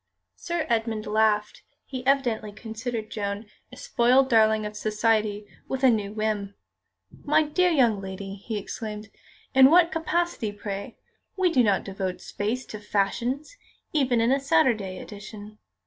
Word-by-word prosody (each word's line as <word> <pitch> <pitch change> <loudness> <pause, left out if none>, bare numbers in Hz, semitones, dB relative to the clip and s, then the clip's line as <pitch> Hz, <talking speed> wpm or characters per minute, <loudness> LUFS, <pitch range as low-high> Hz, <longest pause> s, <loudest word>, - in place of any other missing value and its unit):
Sir 340 -2 -3
Edmund 225 -2 -1
laughed. 210 0 +1 0.2
He 260 -2 -6
evidently 240 -6 +1
considered 220 +1 -5
Joan 205 0 -3 0.3
a - - -12
spoiled 265 - +3
darling 220 -1 +4
of 210 0 -6
Society 215 -1 0 0.2
with 265 0 -4
a 260 - +7
new 205 -3 -1
whim. 210 -2 -2 0.7
"My 300 +2 +3
dear 355 +5 +2
young 240 - +3
lady!" 195 0 -6
he 205 +2 -5
exclaimed, 210 +1 -6 0.4
"in 265 0 +8
what 340 +1 +5
capacity, 325 -8 -1
pray? 200 -1 -6 0.4
We 370 -2 +3
do 260 - +4
not 205 -5 +2
devote 190 -2 -4
space 230 +5 -3
to 215 - -5
fashions, 235 - -1 0.4
even 255 -6 +2
in 230 +2 +3
a 275 - +3
Saturday 255 - +1
edition. 210 +1 -10
220 Hz, 145 wpm, -26 LUFS, 210-265 Hz, 0.7 s, in